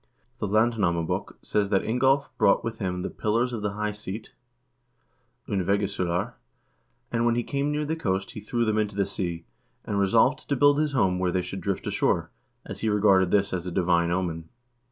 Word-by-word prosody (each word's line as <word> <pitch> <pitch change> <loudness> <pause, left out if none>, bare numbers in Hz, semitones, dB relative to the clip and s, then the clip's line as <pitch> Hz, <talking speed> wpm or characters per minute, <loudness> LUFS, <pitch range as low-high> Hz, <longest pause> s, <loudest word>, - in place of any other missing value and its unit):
The - - -1
"Landnamabok" 100 -6 +1
says 100 -1 0
that 95 -1 +2
Ingolv 135 +4 +2
brought 100 - +4
with 115 - -4
him 90 -3 -2
the - - -2
pillars 115 +4 0
of 115 - -3
the 105 -1 -2
high 105 +1 -2
seat 105 +1 -7 1.1
(ondvegissulur), 100 -2 0 0.8
and 115 -1 +1
when 120 0 +3
he 120 - 0
came 140 +2 -1
near 150 0 -1
the 160 +2 -1
coast 95 -11 -2
be - - -6
threw 115 +3 -1
them 110 -1 +1
into 105 -2 -1
the 100 -1 +1
sea, 85 -4 -4 0.4
and 100 -1 -1
resolved 115 +8 +2
to 140 - +2
build 145 +2 +4
his 150 -1 0
home 95 -8 +2
where 90 -1 +1
they 90 0 0
should - - -6
drift - - -2
ashore, - - 0 0.3
as - - -7
he 110 - +1
regarded 100 -3 +4
this 100 0 +2
as 90 -1 -3
a - - -3
divine 85 -1 +2
omen. 85 -2 -2
105 Hz, 190 wpm, -26 LUFS, 95-115 Hz, 1.1 s, brought